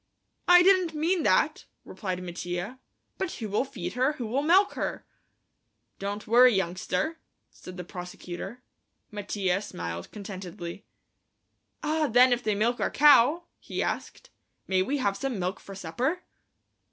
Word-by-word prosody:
"I 355 Hz, 0 st, +8 dB
didn't 370 Hz, -4 st, +4 dB
mean 335 Hz, +4 st, +1 dB
that," -, -, +2 dB, 0.2 s
replied 185 Hz, -3 st, -5 dB
Mattia; 180 Hz, +6 st, -5 dB, 0.4 s
"but 380 Hz, -, -2 dB
who'll 215 Hz, 0 st, -1 dB
feed 275 Hz, -2 st, -6 dB
her, 260 Hz, +4 st, +1 dB
who'll 250 Hz, 0 st, -2 dB
milk 370 Hz, +7 st, +4 dB
her?" -, -, -4 dB, 0.9 s
"Don't 200 Hz, +1 st, -4 dB
worry, 245 Hz, +1 st, +6 dB
youngster," 185 Hz, -, -1 dB, 0.3 s
said 185 Hz, 0 st, -11 dB
the 180 Hz, -, -5 dB
prosecutor. 180 Hz, +6 st, -8 dB, 0.5 s
Mattia 200 Hz, -2 st, -1 dB
smiled 85 Hz, -, -6 dB
contentedly. 190 Hz, -2 st, -8 dB, 1.0 s
"Ah, 310 Hz, 0 st, +1 dB
then 250 Hz, +1 st, +6 dB
if 245 Hz, -, -1 dB
they 215 Hz, -3 st, 0 dB
milk 235 Hz, +4 st, +1 dB
our -, -, +1 dB
cow," 295 Hz, +3 st, +5 dB, 0.2 s
he -, -, -3 dB
asked, -, -, -5 dB, 0.4 s
"may 190 Hz, -1 st, +2 dB
we 270 Hz, +10 st, 0 dB
have 200 Hz, -7 st, 0 dB
some 265 Hz, 0 st, -3 dB
milk 185 Hz, +1 st, -2 dB
for 195 Hz, -, -10 dB
supper?" 250 Hz, -, -2 dB
220 Hz, 135 wpm, -27 LUFS, 185-285 Hz, 1.0 s, I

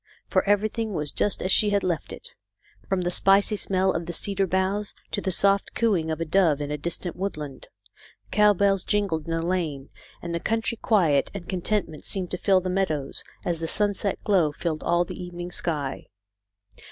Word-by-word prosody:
For -, -, +1 dB
everything 215 Hz, +1 st, +1 dB
was 150 Hz, -2 st, -1 dB
just 205 Hz, -, 0 dB
as 185 Hz, -, 0 dB
she 210 Hz, -, +4 dB
had 200 Hz, -1 st, +1 dB
left 175 Hz, -3 st, -2 dB
it, 485 Hz, -, -9 dB, 0.6 s
from 190 Hz, -1 st, +1 dB
the 175 Hz, 0 st, 0 dB
spicy 195 Hz, +3 st, +4 dB
smell 190 Hz, -1 st, +1 dB
of 170 Hz, -2 st, -3 dB
the 175 Hz, -, -3 dB
cedar 195 Hz, +2 st, +1 dB
boughs, 190 Hz, +3 st, -1 dB, 0.2 s
to -, -, -1 dB
the 190 Hz, -, -1 dB
soft 200 Hz, +2 st, +2 dB
cooing 195 Hz, -9 st, +1 dB
of 160 Hz, -, -2 dB
a 165 Hz, -, -1 dB
dove 165 Hz, -3 st, +3 dB
in 145 Hz, 0 st, -4 dB
a 150 Hz, -, -1 dB
distant 170 Hz, +2 st, -3 dB
woodland. 150 Hz, -8 st, -5 dB, 0.6 s
Cow 210 Hz, 0 st, +5 dB
bells 195 Hz, 0 st, +3 dB
jingled 195 Hz, -7 st, 0 dB
in -, -, -3 dB
the 165 Hz, 0 st, -1 dB
lane, 160 Hz, -7 st, -2 dB, 0.3 s
and 170 Hz, 0 st, -5 dB
the 170 Hz, -, -1 dB
country 225 Hz, +4 st, -1 dB
quiet 165 Hz, -11 st, +3 dB
and 180 Hz, -4 st, -7 dB
contentment 185 Hz, -4 st, -2 dB
seemed 185 Hz, -3 st, -3 dB
to 180 Hz, -, -3 dB
fill 190 Hz, -2 st, +3 dB
the 185 Hz, -, -4 dB
meadows, 180 Hz, -7 st, -1 dB, 0.2 s
as 170 Hz, -2 st, -1 dB
the 165 Hz, -, -3 dB
sunset 205 Hz, +1 st, 0 dB
glow 180 Hz, -7 st, +3 dB
filled 155 Hz, 0 st, -3 dB
all 175 Hz, +1 st, +2 dB
the 180 Hz, -, -7 dB
evening 175 Hz, 0 st, -7 dB
sky. 150 Hz, -6 st, -2 dB
185 Hz, 190 wpm, -25 LUFS, 165-200 Hz, 0.6 s, Cow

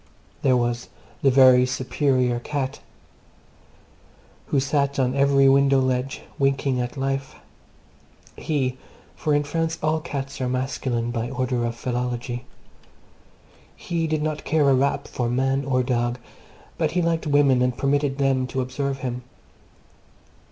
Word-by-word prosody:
There 130 Hz, -2 st, +3 dB
was 120 Hz, 0 st, -1 dB, 0.3 s
the 135 Hz, -, +4 dB
very 130 Hz, -1 st, +7 dB
superior 125 Hz, -1 st, 0 dB
cat 135 Hz, +1 st, -3 dB, 1.7 s
who 140 Hz, -, +1 dB
sat 140 Hz, +1 st, 0 dB
on 130 Hz, -2 st, +1 dB
every 140 Hz, 0 st, +4 dB
window 135 Hz, 0 st, +5 dB
ledge, 130 Hz, 0 st, -1 dB, 0.2 s
winking 135 Hz, -2 st, +1 dB
at 120 Hz, +2 st, -5 dB
life. 135 Hz, 0 st, -2 dB, 1.0 s
He 130 Hz, -4 st, -2 dB, 0.4 s
(for 150 Hz, -1 st, 0 dB
in 145 Hz, -, +2 dB
France 165 Hz, +2 st, -2 dB
all 155 Hz, +1 st, +1 dB
cats 140 Hz, -4 st, -5 dB
are 125 Hz, -, 0 dB
masculine 125 Hz, -2 st, -2 dB
by 120 Hz, 0 st, -3 dB
order 130 Hz, -2 st, -1 dB
of 115 Hz, 0 st, -3 dB
philology), 125 Hz, 0 st, -3 dB, 1.3 s
he 170 Hz, -2 st, -2 dB
did 155 Hz, -1 st, -1 dB
not 155 Hz, -1 st, -2 dB
care 155 Hz, -2 st, +2 dB
a -, -, +5 dB
rap 135 Hz, +2 st, +1 dB
for 120 Hz, -2 st, -2 dB
man 135 Hz, +2 st, +1 dB
or 130 Hz, -2 st, +1 dB
dog, 120 Hz, -1 st, 0 dB, 0.6 s
but -, -, 0 dB
he 180 Hz, -, +2 dB
liked 165 Hz, -1 st, 0 dB
women 140 Hz, -3 st, +4 dB
and 125 Hz, -1 st, +1 dB
permitted 140 Hz, 0 st, 0 dB
them 135 Hz, -2 st, +1 dB
to 130 Hz, -, -2 dB
observe 135 Hz, +1 st, -3 dB
him. 125 Hz, -1 st, -3 dB
135 Hz, 135 wpm, -23 LUFS, 125-140 Hz, 1.7 s, very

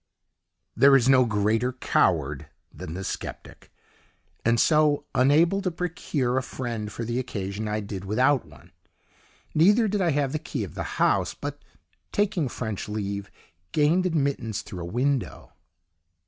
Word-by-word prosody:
There 140 Hz, 0 st, +6 dB
is 130 Hz, -2 st, +4 dB
no 130 Hz, -1 st, +6 dB
greater 110 Hz, +3 st, +1 dB
coward 75 Hz, -, +1 dB, 0.3 s
than 80 Hz, -, -7 dB
the 95 Hz, -, -5 dB
sceptic, -, -, -7 dB, 0.7 s
and 115 Hz, 0 st, +2 dB
so, 150 Hz, -1 st, +3 dB
unable 155 Hz, +9 st, +4 dB
to 190 Hz, -, 0 dB
procure 160 Hz, -7 st, -1 dB
a -, -, -3 dB
friend 115 Hz, -5 st, -5 dB
for 115 Hz, +2 st, -5 dB
the 120 Hz, +2 st, -1 dB
occasion, 105 Hz, -4 st, -4 dB
I 105 Hz, 0 st, -1 dB
did 100 Hz, -2 st, -6 dB
without 125 Hz, +6 st, +2 dB
one; 80 Hz, +2 st, -18 dB, 0.8 s
neither 205 Hz, +8 st, +5 dB
did 205 Hz, 0 st, 0 dB
I 175 Hz, -, +2 dB
have 140 Hz, -3 st, 0 dB
the 155 Hz, -, -2 dB
key 140 Hz, -6 st, -4 dB
of 95 Hz, -, -7 dB
the -, -, -5 dB
house, -, -, +2 dB
but -, -, -6 dB, 0.5 s
taking 200 Hz, -9 st, 0 dB
French 110 Hz, -4 st, -5 dB
leave 100 Hz, -1 st, -4 dB, 0.4 s
gained 165 Hz, +5 st, +3 dB
admittance 140 Hz, -, -1 dB
through 90 Hz, -, -8 dB
a -, -, -4 dB
window. 125 Hz, +8 st, -2 dB
125 Hz, 145 wpm, -26 LUFS, 105-150 Hz, 0.8 s, There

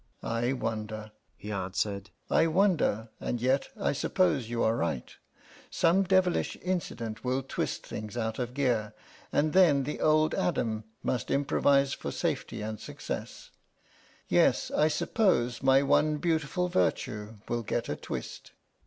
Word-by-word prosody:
"I 115 Hz, +3 st, 0 dB
wonder," 110 Hz, -3 st, -4 dB, 0.3 s
he 105 Hz, -, -7 dB
answered, 100 Hz, +1 st, -2 dB, 0.2 s
"I 165 Hz, -, +3 dB
wonder,... 160 Hz, -, +2 dB
and 120 Hz, -, -2 dB
yet 130 Hz, +3 st, +1 dB
I -, -, +1 dB
suppose 145 Hz, -, +1 dB
you 120 Hz, -1 st, 0 dB
are 110 Hz, -, +3 dB
right. 80 Hz, -, -2 dB, 0.5 s
Some 175 Hz, +4 st, +3 dB
devilish 185 Hz, -1 st, +2 dB
incident 115 Hz, -12 st, -3 dB
will 130 Hz, +1 st, 0 dB
twist 135 Hz, -, -3 dB
things 105 Hz, +2 st, -6 dB
out 110 Hz, 0 st, -2 dB
of 125 Hz, 0 st, -3 dB
gear, 115 Hz, -6 st, 0 dB, 0.4 s
and 150 Hz, +1 st, +1 dB
then 165 Hz, -7 st, +5 dB
the 150 Hz, +3 st, -4 dB
old 155 Hz, 0 st, +3 dB
Adam 110 Hz, -10 st, -1 dB, 0.2 s
must 125 Hz, -4 st, -1 dB
improvise 140 Hz, 0 st, +3 dB
for -, -, -5 dB
safety -, -, -2 dB
and 110 Hz, 0 st, -4 dB
success. -, -, -7 dB, 0.8 s
Yes, -, -, +3 dB
I 155 Hz, -, +3 dB
suppose 150 Hz, -, +1 dB
my 135 Hz, +1 st, +5 dB
one 150 Hz, +2 st, +3 dB
beautiful 165 Hz, +2 st, 0 dB
virtue 105 Hz, -, -1 dB
will 120 Hz, 0 st, -1 dB
get 115 Hz, +1 st, -2 dB
a 75 Hz, -, -2 dB
twist." -, -, -7 dB
125 Hz, 140 wpm, -29 LUFS, 110-155 Hz, 0.8 s, then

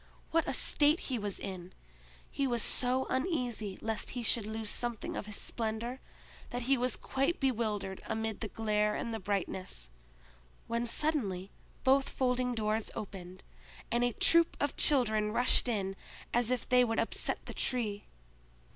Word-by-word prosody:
What 330 Hz, 0 st, +2 dB
a -, -, 0 dB
state 300 Hz, +3 st, +3 dB
he 250 Hz, -, 0 dB
was 205 Hz, -2 st, -3 dB
in! 185 Hz, -2 st, -6 dB, 0.6 s
He 275 Hz, -, 0 dB
was 240 Hz, -3 st, +1 dB
so 255 Hz, +1 st, +2 dB
uneasy 250 Hz, -, -1 dB
lest 220 Hz, -1 st, -1 dB
he 240 Hz, -, -2 dB
should 225 Hz, -2 st, +3 dB
lose 220 Hz, -1 st, -3 dB
something 240 Hz, -3 st, -2 dB
of 210 Hz, -, -4 dB
his 210 Hz, -, -6 dB
splendor, 230 Hz, +4 st, -3 dB, 0.5 s
that 245 Hz, 0 st, -3 dB
he 270 Hz, +3 st, +4 dB
was 250 Hz, 0 st, +1 dB
quite 275 Hz, +6 st, -1 dB
bewildered 215 Hz, -7 st, -1 dB
amid 220 Hz, -1 st, -2 dB
the 220 Hz, -, -3 dB
glare 210 Hz, -1 st, 0 dB
and 225 Hz, -3 st, -4 dB
brightness; 185 Hz, -, -3 dB, 0.7 s
when 235 Hz, +1 st, -1 dB
suddenly 215 Hz, -, 0 dB, 0.3 s
both 270 Hz, +1 st, +4 dB
folding 250 Hz, -1 st, 0 dB
doors 215 Hz, 0 st, 0 dB
opened, 185 Hz, -2 st, -7 dB, 0.5 s
and 240 Hz, +1 st, +2 dB
a 245 Hz, -1 st, +1 dB
troop 335 Hz, +7 st, +4 dB
of 290 Hz, -, 0 dB
children 215 Hz, -7 st, +3 dB
rushed 245 Hz, +2 st, +5 dB
in 195 Hz, -5 st, -1 dB, 0.4 s
as 240 Hz, -1 st, +2 dB
if 250 Hz, -2 st, -1 dB
they 250 Hz, 0 st, +5 dB
would 225 Hz, -2 st, 0 dB
upset 230 Hz, -, 0 dB
the -, -, -6 dB
Tree. 215 Hz, -5 st, 0 dB
230 Hz, 155 wpm, -32 LUFS, 210-250 Hz, 0.7 s, rushed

